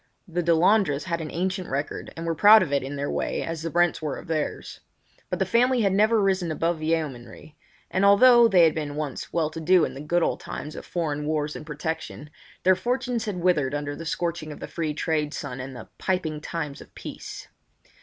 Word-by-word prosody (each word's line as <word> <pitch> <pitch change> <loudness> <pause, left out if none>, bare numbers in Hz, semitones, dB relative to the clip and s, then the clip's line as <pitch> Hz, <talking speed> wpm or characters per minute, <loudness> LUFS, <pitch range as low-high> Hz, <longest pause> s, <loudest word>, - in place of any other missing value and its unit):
The 175 0 -1
Delandres 170 -2 +3
had 170 -2 -2
an 155 - -5
ancient 185 +2 -2
record 140 +2 -4
and 165 - -5
were 165 - 0
proud 210 +6 +7
of 145 -5 -4
it 140 - +2
in 135 +2 -5
their 140 0 -2
way - - -2
as 165 -1 -4
the 165 - -3
Brents 175 0 +2
were 150 -3 -3
of - - -10
theirs. 155 -2 -3 0.5
But - - -1
the - - +1
family 245 +1 +3
had 195 -2 +2
never 215 +3 +4
risen 190 -4 +1
above 165 +1 -1
yeomanry; 150 -3 -3 0.4
and 185 - +1
although 235 +4 +7
they 185 -6 +5
had 160 -2 +5
been 150 -2 -4
once 150 -3 -4
well 160 -2 0
to 165 - -6
do 180 +1 +4
in - - -6
the 135 - -8
good 170 +3 +1
old - - 0
times 150 - -7
of - - -9
foreign 150 -4 -2
wars 150 -1 -1
and 155 - -8
protection, 150 0 -5 0.3
their 185 0 +5
fortunes 245 +3 -1
had 195 -5 -4
withered 150 -7 +2
under 145 0 -3
the 165 - -7
scorching 170 -2 -2
of 150 - -9
the - - -6
free 155 -3 -3
trade 155 -1 -1
sun 130 -3 -5
and 130 +1 -7
the 115 - -9
"piping 160 -5 -1
times 150 -3 -5
of - - -16
peace." - - -8
165 Hz, 215 wpm, -25 LUFS, 150-185 Hz, 0.5 s, proud